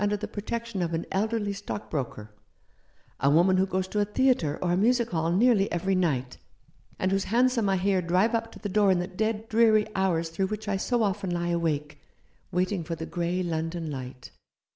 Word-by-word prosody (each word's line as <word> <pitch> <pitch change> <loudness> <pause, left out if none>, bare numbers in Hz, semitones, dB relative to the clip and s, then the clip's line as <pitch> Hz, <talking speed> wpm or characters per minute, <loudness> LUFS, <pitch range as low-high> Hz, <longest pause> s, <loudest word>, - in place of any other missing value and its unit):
under 205 0 +1
the 215 +1 -5
protection 230 0 -4
of 170 -1 -1
an 165 - -3
elderly 205 +1 0
stock 205 +1 -6
broker; 115 -7 -4 0.9
a 140 - +3
woman 175 +5 +4
who 190 +1 +2
goes 185 0 -1
to 210 - -2
a - - +4
theatre 210 - +1
or 175 - 0
a - - +3
music 235 +4 +2
hall 165 -1 0
nearly 205 +1 +3
every 180 +3 0
night, 140 -9 0 0.6
and 185 - 0
whose 195 0 +1
hansom 240 -2 +2
I 190 - +2
hear 190 0 +1
drive 180 +6 +2
up 225 0 -1
to - - -11
the - - -5
door 205 0 +3
in 185 - +4
the 175 - -1
dead, 215 +4 -2
dreary 220 -1 +4
hours 175 -4 0
through 190 +4 -1
which 215 +1 -5
I 200 -2 0
so 240 +4 0
often 195 -2 -1
lie 175 0 -1
awake, 155 -3 -1 0.5
waiting 185 0 0
for 165 +1 -4
the 160 0 -6
grey 175 +2 -2
London 165 -1 -3
light. 130 -2 -8
190 Hz, 205 wpm, -27 LUFS, 170-210 Hz, 0.9 s, woman